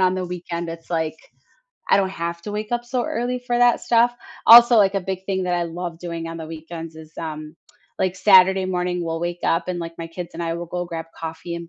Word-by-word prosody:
on 185 0 +3
the 185 -1 -2
weekend, 175 -1 -5
it's, 165 0 -8
like, 160 -2 -1 0.7
I - - +6
don't 195 -1 +1
have 170 -2 -4
to 210 - -6
wake 210 +2 -4
up 240 0 0
so 245 0 -2
early 245 +2 -2
for 245 -1 -1
that 245 -1 +4
stuff. 240 +1 +3 0.3
Also, 235 +1 +10
like, 200 -1 +4
a 195 - +1
big 190 0 -4
thing 190 -1 -1
that 180 -1 0
I 175 -1 0
love 170 0 -6
doing 170 -1 -5
on 165 0 -6
the 160 - -6
weekends 165 0 -8
is, 160 0 -12
um, 155 -1 -6 0.4
like, 185 0 0
Saturday 190 0 +6
morning, 180 -1 -1
we'll 165 0 -3
wake 175 0 -3
up 170 +2 +1
and, 180 -1 -2
like, 165 -1 -7
my 165 - -5
kids 170 +1 -7
and 170 - -4
I 165 0 -2
will 170 +1 -5
go 175 +1 -4
grab 165 -1 -5
coffee 165 +1 -6
and 170 0 -7
175 Hz, 240 wpm, -22 LUFS, 165-190 Hz, 0.7 s, Also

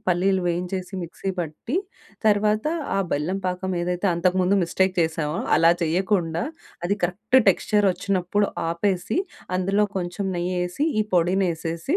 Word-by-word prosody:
పల్లీలు 185 +1 +2
వేయించేసి 180 +2 -2
మిక్సీ 185 +3 -4
పట్టి 165 - -4 0.5
తర్వాత 210 +3 +3 0.3
ఆ - - +2
బెల్లం 170 +7 -1
పాకం 185 +1 -2
ఏదైతే 180 +2 -1
అంతకు 180 +2 +1
ముందు 185 +2 +3
మిస్టేక్ 190 +2 +1
చేసామో 160 -1 -1 0.2
అలా 165 +1 +6
చేయకుండా 170 0 +1 0.4
అది 200 +3 +2
కరెక్ట్ 210 +8 +1
టెక్స్చరొచ్చినప్పుడు 200 0 +2 0.2
ఆపేసి, 180 - -1 0.4
అందులో 195 +3 +2
కొంచెం 180 +2 -3
నెయ్యేసి, 180 - -1 0.2
ఈ - - +4
పొడినేసేసి 175 - +1
180 Hz, 120 wpm, -24 LUFS, 170-195 Hz, 0.5 s, అలా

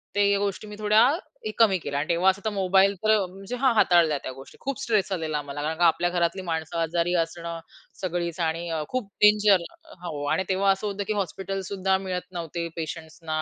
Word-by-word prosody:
ते 200 0 +3
गोष्टी 200 +1 -2
मी 210 - -8
थोड्या 215 +1 +5 0.5
कमी 210 -5 +5
केल्या. 140 -3 -3
आणि 155 - -2
तेव्हा 175 +3 +4
असं 190 +1 -1
तर - - +2
मोबाईल 195 0 +3
तर 215 0 +5
म्हणजे 195 +6 -7
हा 260 0 +3
हाताळल्या 170 -8 +4
त्या 130 - -4
गोष्टी 135 +1 -13
खूप 275 -2 -3
स्ट्रेस 210 -4 +1
आलेला 160 -5 -1
मला 145 0 -6
कारण 160 +2 -2
का 175 - +3
आपल्या 175 +1 +3
घरातली 175 +1 0
माणसं 165 -2 -3
आजारी 170 +2 0
असणं 170 0 -7 0.4
सगळीच 175 -2 -2
आणि 165 +1 -1
अ, 160 -2 -2
खूप 255 -5 -2
डेंजर 210 -2 +6 0.2
अ, 315 - -15
हो 150 -3 -4
आणि 190 - +1
तेव्हा 195 +1 +3
असं 195 +2 -1
होतं 200 0 -3
की 215 - 0
हॉस्पिटलसुद्धा 190 0 -1
मिळत 185 -1 -3
नव्हते 170 -1 -4
पेशंट्सना, 160 -1 -4
180 Hz, 195 wpm, -25 LUFS, 165-200 Hz, 0.5 s, डेंजर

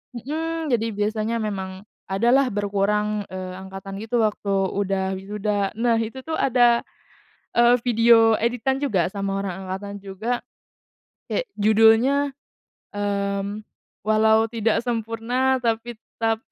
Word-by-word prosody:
Mhm, 315 +4 -3
jadi 225 -1 +1
biasanya 215 +2 -1
memang 195 -2 -4 0.2
ada 195 +5 +1
lah 270 0 +4
berkurang, 205 0 0
eee, 185 0 -6
angkatan 195 +1 -8
gitu 225 +1 0
waktu 210 -1 -1 0.2
udah 195 -1 -1
wisuda. 200 +1 -2
Nah 230 -1 +2
itu 230 +4 -4
tuh 320 0 -3
ada, 240 -2 +4 0.7
eee, 240 +1 +5
video 230 -1 +5
editan 245 +3 0
juga 190 - 0
sama 195 -1 -2
orang 190 -2 -3
angkatan 200 +2 -5
juga, 215 +5 -3 0.9
kayak - - -1
judulnya, 225 +7 +4 0.6
mmm, 200 0 -2 0.4
Walau 220 +1 +3
Tidak 225 -1 0
Sempurna 240 +3 -1
Tapi 230 0 -1
Tetap 225 0 -3
220 Hz, 120 wpm, -23 LUFS, 200-235 Hz, 0.9 s, eee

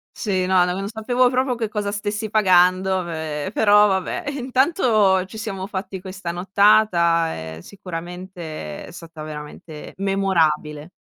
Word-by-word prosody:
Sì, 190 -4 -1
no. 185 -1 +4
N - - 0
non 190 +2 -3
sapevo 245 +3 +1
proprio 255 0 0
che 230 -2 -2
cosa 210 -1 -2
stessi 205 +1 -3
pagando, 185 -2 +3
ehm, 160 +1 -4
però 210 -1 +5
vabbè. 190 -2 -2
Intanto 245 - +2
ci 215 +3 -10
siamo 195 -4 -4
fatti 190 -1 -5
questa 185 -1 -7
nottata, 180 -3 +3 0.2
ehm, - - -10
sicuramente 175 - -8
è - - -12
stata 165 -2 -10
veramente 150 0 -9
memorabile. 165 -6 0
190 Hz, 135 wpm, -21 LUFS, 170-210 Hz, 0.2 s, però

